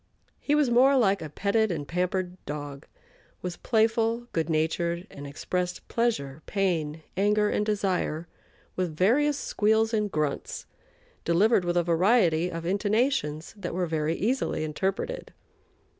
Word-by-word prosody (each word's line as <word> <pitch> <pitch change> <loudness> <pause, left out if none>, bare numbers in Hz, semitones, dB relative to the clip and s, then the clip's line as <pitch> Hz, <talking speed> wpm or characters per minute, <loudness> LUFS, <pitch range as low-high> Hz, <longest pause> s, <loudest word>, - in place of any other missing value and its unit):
He 295 - +1
was 295 -5 +3
more 265 +3 +5
like 200 -5 +3
a 155 - -5
petted 205 +6 +1
and 145 -4 -4
pampered 180 +1 -2
dog, 145 -1 -6 0.6
was 180 -1 -3
playful, 225 +1 +1
good 165 -1 -1
natured, 170 +2 0
and 145 0 -8
expressed 180 +5 -3
pleasure, 160 - -1
pain, 165 -6 -1
anger, 210 +2 +2
and - - +1
desire, 190 -6 -1 0.5
with 180 -4 -2
various 285 - +3
squeals 220 0 +1
and 210 -2 0
grunts, 150 -3 -2 0.6
delivered 190 +4 +3
with 175 0 0
a 175 - +3
variety 175 -1 +3
of 165 -1 -5
intonations 200 - 0
that 185 -5 -5
were 180 -1 0
very 160 -1 -1
easily 220 -7 -1
interpreted. 195 - -3
185 Hz, 135 wpm, -27 LUFS, 160-220 Hz, 0.6 s, more